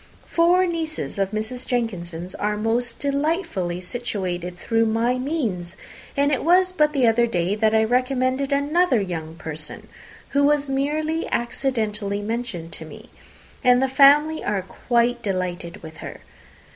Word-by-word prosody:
Four 350 Hz, +2 st, +3 dB
nieces 325 Hz, -, -3 dB
of 195 Hz, -1 st, +1 dB
Mrs. 220 Hz, +4 st, -4 dB
Jenkinson 180 Hz, -9 st, -2 dB
are 210 Hz, +1 st, 0 dB
most 230 Hz, +2 st, -1 dB
delightfully 280 Hz, -, -1 dB
situated 180 Hz, -4 st, -4 dB
through 225 Hz, +4 st, +1 dB
my 235 Hz, +3 st, +1 dB
means; 235 Hz, -, -3 dB, 0.4 s
and 285 Hz, +1 st, +3 dB
it 275 Hz, -, 0 dB
was 365 Hz, +3 st, +4 dB
but 300 Hz, -4 st, +2 dB
the 275 Hz, -4 st, +2 dB
other 235 Hz, +1 st, +4 dB
day 180 Hz, -3 st, 0 dB
that 215 Hz, +1 st, +2 dB
I 220 Hz, -, +4 dB
recommended 255 Hz, +3 st, +1 dB
another 285 Hz, 0 st, +2 dB
young 165 Hz, -5 st, -4 dB
person, 155 Hz, -1 st, -7 dB, 0.4 s
who 285 Hz, 0 st, +2 dB
was 290 Hz, 0 st, +3 dB
merely 305 Hz, +4 st, -1 dB
accidentally 215 Hz, -5 st, -1 dB
mentioned 215 Hz, -7 st, -4 dB
to 160 Hz, -, -7 dB
me, 220 Hz, +9 st, -13 dB, 0.5 s
and 250 Hz, 0 st, +5 dB
the 265 Hz, -, +2 dB
family 290 Hz, +4 st, +5 dB
are 200 Hz, -2 st, -1 dB
quite 240 Hz, +4 st, 0 dB
delighted 180 Hz, -4 st, -3 dB
with 160 Hz, 0 st, -10 dB
her. -, -, -8 dB
235 Hz, 145 wpm, -23 LUFS, 195-280 Hz, 0.5 s, and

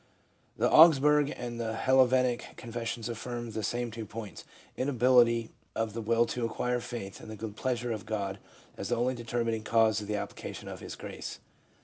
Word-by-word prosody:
The -, -, +3 dB
Augsburg 150 Hz, -2 st, +7 dB
and 120 Hz, -1 st, -5 dB
the 110 Hz, -1 st, -2 dB
Hel 130 Hz, +3 st, +5 dB
vetic 125 Hz, -1 st, 0 dB
confessions 115 Hz, -1 st, -4 dB
affirm 120 Hz, 0 st, -5 dB
the 110 Hz, 0 st, -3 dB
same 120 Hz, +3 st, -2 dB
two 110 Hz, -1 st, -6 dB
points: 110 Hz, -2 st, -8 dB, 0.3 s
Inability 120 Hz, -3 st, +3 dB, 0.2 s
of 110 Hz, -2 st, -1 dB
the 115 Hz, -, -4 dB
will 115 Hz, +1 st, +3 dB
to 120 Hz, +1 st, -3 dB
acquire 125 Hz, +2 st, -1 dB
faith 115 Hz, -5 st, -6 dB
and -, -, -10 dB
the 110 Hz, -, -6 dB
good 110 Hz, -1 st, -6 dB
pleasure 120 Hz, 0 st, -1 dB
of 110 Hz, -1 st, -5 dB
God 100 Hz, -3 st, -2 dB, 0.4 s
as -, -, -4 dB
the 120 Hz, -, +2 dB
only 125 Hz, +2 st, +1 dB
determining 115 Hz, -2 st, -2 dB
cause 110 Hz, -1 st, +3 dB
of 105 Hz, -, -7 dB
the 105 Hz, -, -1 dB
application 105 Hz, -, -6 dB
of -, -, -7 dB
His -, -, -7 dB
Grace. -, -, -7 dB
115 Hz, 180 wpm, -30 LUFS, 110-125 Hz, 0.4 s, Augsburg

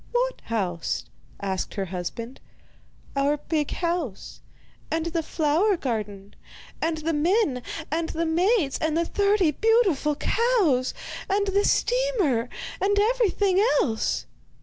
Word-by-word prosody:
'What -, -, 0 dB
house?' 185 Hz, -7 st, -2 dB, 0.3 s
asked 190 Hz, -2 st, -3 dB
her 195 Hz, -, -1 dB
husband. 190 Hz, +8 st, -5 dB, 0.8 s
'Our 280 Hz, +2 st, +2 dB
big 300 Hz, 0 st, -1 dB
house, 335 Hz, -, -3 dB, 0.5 s
and 320 Hz, 0 st, -1 dB
the 335 Hz, 0 st, -1 dB
flower 325 Hz, +6 st, +1 dB
garden, 210 Hz, -7 st, -4 dB, 0.5 s
and 325 Hz, 0 st, 0 dB
the 320 Hz, +1 st, -1 dB
men 310 Hz, -, +2 dB, 0.3 s
and 325 Hz, +1 st, -1 dB
the 330 Hz, +1 st, -1 dB
maids, 340 Hz, -, +2 dB
and 315 Hz, 0 st, 0 dB
the 335 Hz, -, +2 dB
thirty 400 Hz, -3 st, +2 dB
beautiful 385 Hz, -, +2 dB
cows, 365 Hz, -, +2 dB, 0.3 s
and 400 Hz, +1 st, +2 dB
the 400 Hz, +1 st, +2 dB
steamer, 420 Hz, -, +1 dB, 0.3 s
and 405 Hz, +1 st, +2 dB
everything 410 Hz, -4 st, +2 dB, 0.2 s
else? 220 Hz, -3 st, -1 dB
325 Hz, 120 wpm, -25 LUFS, 260-405 Hz, 0.8 s, Our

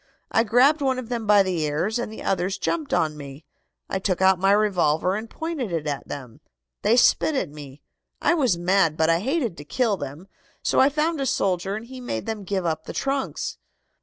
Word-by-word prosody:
I 225 Hz, -, +3 dB
grabbed 260 Hz, +7 st, +4 dB
one 265 Hz, -2 st, +1 dB
of 250 Hz, -2 st, -6 dB
them 235 Hz, -3 st, -3 dB
by 205 Hz, -1 st, +6 dB
the 185 Hz, -3 st, -2 dB
ears, 160 Hz, +9 st, -1 dB
and 235 Hz, -, -4 dB
the 220 Hz, -, -8 dB
others 190 Hz, +1 st, 0 dB
jumped 310 Hz, +7 st, -2 dB
on 155 Hz, -1 st, +1 dB
me. 140 Hz, +1 st, -10 dB, 0.4 s
I 190 Hz, -, -2 dB
took 190 Hz, -2 st, -1 dB
out 190 Hz, -1 st, +4 dB
my 195 Hz, +1 st, +3 dB
revolver 185 Hz, -4 st, +2 dB
and 220 Hz, +2 st, -5 dB
pointed 315 Hz, -, -4 dB
it 165 Hz, -3 st, -2 dB
at 145 Hz, -2 st, -3 dB
them. 125 Hz, -5 st, -8 dB, 0.4 s
They 220 Hz, +4 st, +3 dB
spit 290 Hz, +4 st, +4 dB
at 185 Hz, -, -1 dB
me. 145 Hz, -1 st, -11 dB, 0.4 s
I -, -, +3 dB
was 260 Hz, -, +2 dB
mad, 175 Hz, -2 st, +2 dB
but 160 Hz, +1 st, +3 dB
I 165 Hz, -, +2 dB
hated 250 Hz, -, -1 dB
to 145 Hz, -, -8 dB
kill 220 Hz, -, 0 dB
them, 145 Hz, +5 st, -7 dB, 0.4 s
so -, -, +2 dB
I 270 Hz, -, +6 dB
found 305 Hz, +1 st, 0 dB
a 270 Hz, -, 0 dB
soldier, 190 Hz, -2 st, 0 dB
and 220 Hz, +2 st, -6 dB
he 255 Hz, +1 st, -10 dB
made 110 Hz, -, -4 dB
them 215 Hz, -3 st, -4 dB
give 190 Hz, -1 st, -2 dB
up 160 Hz, -1 st, -2 dB
the -, -, -6 dB
trunks. 275 Hz, -1 st, -2 dB
195 Hz, 215 wpm, -24 LUFS, 165-245 Hz, 0.4 s, by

